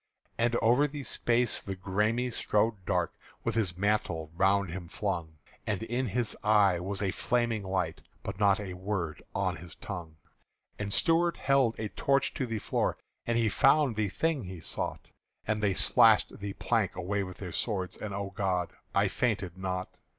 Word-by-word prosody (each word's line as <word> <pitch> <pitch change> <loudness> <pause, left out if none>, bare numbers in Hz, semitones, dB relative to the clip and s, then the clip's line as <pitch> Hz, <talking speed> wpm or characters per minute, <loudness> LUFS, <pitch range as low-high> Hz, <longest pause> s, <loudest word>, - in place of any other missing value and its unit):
And 120 +1 +2
over 125 +6 +5
the 145 0 -6
space 120 -2 +2
the 95 - -5
Græme 105 +6 0
strode 105 -2 +1
dark - - +1 0.3
With - - 0
his 95 -7 0
mantle 90 -6 0
round 95 0 +2
him 90 0 -6
flung; 85 -4 -3 0.3
And 105 -1 -1
in 120 +3 -1
his 115 +2 -1
eye 105 -4 +4
was 95 +3 -3
a 95 - +1
flaming 120 +1 0
light 95 -1 -2 0.2
But 95 - -5
not 100 -1 +4
a 95 -3 -5
word 90 -4 -3
on - - 0
his 85 -1 -10
tongue. 85 -5 -7 0.6
And 100 -1 -3
Stuart 165 - +3
held 135 -4 +3
a 110 -1 -3
torch 140 +5 +1
to 130 - -2
the 115 -1 -2
floor, - - 0 0.3
And 120 0 +2
he 115 -1 +3
found 135 +4 +4
the 105 -2 0
thing 155 - 0
he 90 -1 -7
sought; - - -3 0.4
And 105 0 0
they 100 -3 +2
slashed - - +5
the 100 -1 -4
plank 115 -3 0
away 100 +3 -1
with 90 -2 -6
their 95 -3 -6
swords 95 -4 -1
And 105 - -6
O 100 0 -4
God! 95 -3 -1 0.2
I - - +4
fainted 100 -7 -1
not! 95 -1 -4
100 Hz, 175 wpm, -30 LUFS, 95-115 Hz, 0.6 s, over